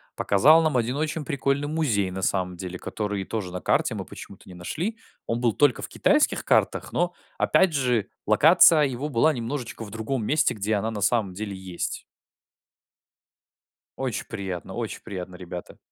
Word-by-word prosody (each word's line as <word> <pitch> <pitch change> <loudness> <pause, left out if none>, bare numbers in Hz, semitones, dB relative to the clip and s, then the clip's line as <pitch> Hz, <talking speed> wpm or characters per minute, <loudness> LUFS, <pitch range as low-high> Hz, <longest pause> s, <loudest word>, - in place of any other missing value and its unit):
Показал 145 +12 +5
нам 155 -5 +1
один 120 +2 0
очень 155 +1 -2
прикольный 140 0 0
музей, 125 -12 0
на 95 +1 -5
самом 90 -1 -1
деле, 90 0 -6
который 105 -2 -3
тоже 100 -4 -4
на 90 0 -5
карте - - +1
мы - - -5
почему-то - - -12
не 90 - -11
нашли. 165 - -4 0.3
Он 115 - -1
был 120 -3 +2
только 145 -1 +3
в - - -4
китайских - - +2
картах, - - +1
но 175 0 0 0.2
опять 190 -3 +3
же 125 -6 +1 0.2
локация 155 - +6
его 135 +1 -2
была 150 +4 +3
немножечко 120 -1 -5
в 105 - -9
другом 115 +2 -3
месте, 150 +5 +2
где 105 0 -1
она 105 +2 -1
на 105 -2 -5
самом 100 -2 +1
деле 100 +1 -5
есть. 95 -2 -5 1.9
Очень - - -3
приятно, 95 -1 -5
очень 115 0 -4
приятные 90 -4 -7
ребята. 90 -1 -8
115 Hz, 165 wpm, -25 LUFS, 95-145 Hz, 1.9 s, локация